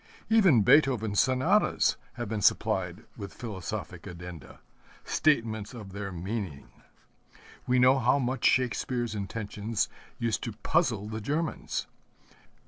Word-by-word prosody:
Even 185 - +6
Beethoven's 110 -6 +4
Sonatas 180 +11 +3 0.2
have 120 -2 -5
been 105 0 -3
supplied - - +1
with 100 - -8
philosophic 100 -8 -6
addenda 90 -5 -9 0.4
statements 115 -7 +1
of 105 -5 -9
their 100 0 -5
meaning. 90 - -5 1.0
We 125 - +3
know 130 +2 +5
how 125 +2 +3
much 130 -2 -2
Shakespeare's 120 -1 +1
intentions 105 +1 -3 0.3
used 115 -2 -1
to 115 - -4
puzzle 115 - 0
the 110 0 -5
Germans. 155 +8 -2
115 Hz, 115 wpm, -28 LUFS, 100-130 Hz, 1.0 s, Even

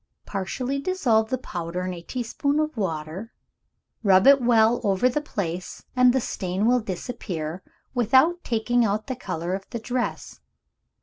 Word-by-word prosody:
Partially 250 +8 -3
dissolve 245 -10 +1
the 260 - 0
powder 175 -6 -4
in 185 - -3
a 170 - -8
teaspoonful 280 - -1
of 305 - -12
water; 180 +1 -4 0.7
rub 195 -3 +5
it 275 0 +7
well 235 -1 +4
over 200 +3 +3
the 255 +4 0
place, 185 - -5
and 250 0 +6
the 265 - +2
stain 190 -3 -2
will 250 +2 +4
disappear, 180 -5 -5 0.3
without 260 +9 +3
taking 240 +1 +1
out 215 0 0
the 260 - -3
color 180 -6 -4
of 195 0 -5
the - - -4
dress. 245 +2 -3
225 Hz, 150 wpm, -25 LUFS, 185-250 Hz, 0.7 s, it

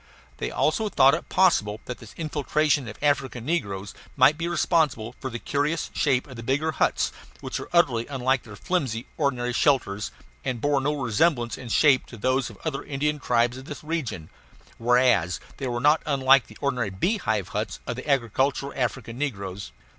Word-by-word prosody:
They - - -3
also 210 +8 +1
thought 135 -7 +5
it 165 - -3
possible 110 - +3
that 125 - -6
this 115 - -13
infiltration 150 -3 0
of 110 - -8
African 135 -5 0
negroes 100 - -2 0.2
might 135 +3 +6
be 165 +2 -3
responsible 155 -9 +1
for 130 - -4
the 120 - -4
curious 145 +6 -1
shape 130 -4 +1
of 130 -4 -11
the - - -6
bigger 140 +7 0
huts, 155 - +1 0.3
which - - -4
were - - -8
utterly 130 -10 +3
unlike 130 -2 0
their 105 -3 -11
flimsy, 125 - -2
ordinary 125 -5 0
shelters, 110 -8 +1 0.3
and 125 -3 -2
bore 145 +2 +1
no 145 +2 0
resemblance 125 -1 +1
in 125 - -9
shape 140 +2 +4
to 120 - -11
those 130 +3 +1
of 110 - -12
the - - -18
other 135 -3 -2
Indian 150 +1 -1
tribes 120 -2 +1
of 130 - -10
this 145 +1 -8
region; 150 - -4 0.5
whereas 115 -9 +3 0.2
they 135 - -3
were 120 -1 -2
not 150 +5 +4
unlike 135 -2 +4
the - - -14
ordinary 125 -6 0
beehive 105 - -1
huts 105 +2 -3
of 120 - -3
the 130 +4 -7
agricultural 135 +2 +1
African 120 -1 -3
negroes. 100 -9 -4
130 Hz, 180 wpm, -25 LUFS, 115-145 Hz, 0.5 s, might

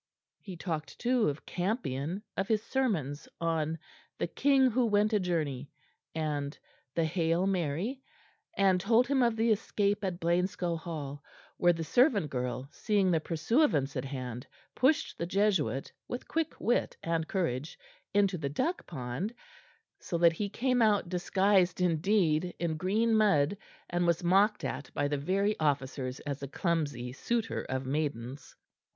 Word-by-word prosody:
'" - - -62
He 185 -4 -8
talked, 160 -3 -4
too, 245 -6 +2
of 145 +1 -6
Campion, 180 - -2
of 195 - -1
his 215 -1 +1
sermons 190 - -1
on 165 -1 0 0.4
"The - - 0
King 270 -2 +3
who 245 +1 +2
went 210 +1 +2
a 210 - +4
journey," 155 -7 -2 0.5
and 150 -2 -2 0.4
the 165 - +2
"Hail, 165 +2 +1
Mary"; 190 - -1 0.6
and 190 -2 +4
told 230 +5 +4
him 270 0 +2
of 235 -2 +3
the 225 +1 +2
escape 205 -1 0
at 180 -3 -2
Blainscow 175 0 0
Hall, 150 -4 -6 0.3
where 175 - +5
the 165 -1 -4
servant 210 - +3
girl, 125 0 -3
seeing 200 -4 +1
the 165 - +3
pursuivants 160 - +1
at 130 0 -2
hand, 125 -3 -5 0.3
pushed 305 +5 +1
the 170 - -2
Jesuit, 190 -8 +1 0.2
with 245 - -5
quick 320 -1 -2
wit 240 - 0
and 165 -1 -1
courage, 155 -6 -2 0.3
into 200 -3 +2
the 140 -3 -2
duck 330 - -2
pond, 150 - -4 0.6
so 170 - -3
that 170 -1 +5
he 200 +5 -3
came 250 +3 +1
out 210 -5 +3
disguised 185 0 +2
indeed 180 -1 +2
in 170 -2 -1
green 210 +7 +1
mud 200 -6 +3 0.3
and 175 0 0
was 170 0 +1
mocked 195 +4 +3
at 135 0 -4
by 145 - +1
the 145 0 -1
very 195 +7 +1
officers 135 -3 -1
as 140 -2 -4
a 140 - -4
clumsy 145 -6 -1
suitor 230 - -1
of 130 0 -2
maidens. 135 -2 -3
175 Hz, 155 wpm, -30 LUFS, 145-210 Hz, 0.6 s, where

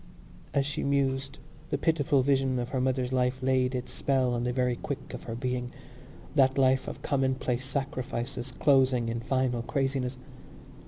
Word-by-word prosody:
As 140 -1 +1
she 145 - -3
mused 135 -1 0 0.3
the - - 0
pitiful 145 -2 +2
vision 135 -1 +2
of 120 0 -2
her 130 -1 -1
mother's 130 -1 0
life 130 0 +1
laid 130 0 +2
its 125 0 -4
spell 130 -3 +1
on 120 0 -1
the 125 - 0
very 125 -1 +1
quick 140 +3 -6
of - - -6
her 115 - -4
being—that 130 +2 -2
life 130 -1 +3
of - - -7
commonplace 130 -2 0
sacrifices 130 -2 -3
closing 130 -4 +3
in 115 0 -2
final 125 0 0
craziness. 135 0 -1
130 Hz, 155 wpm, -29 LUFS, 125-135 Hz, 0.3 s, life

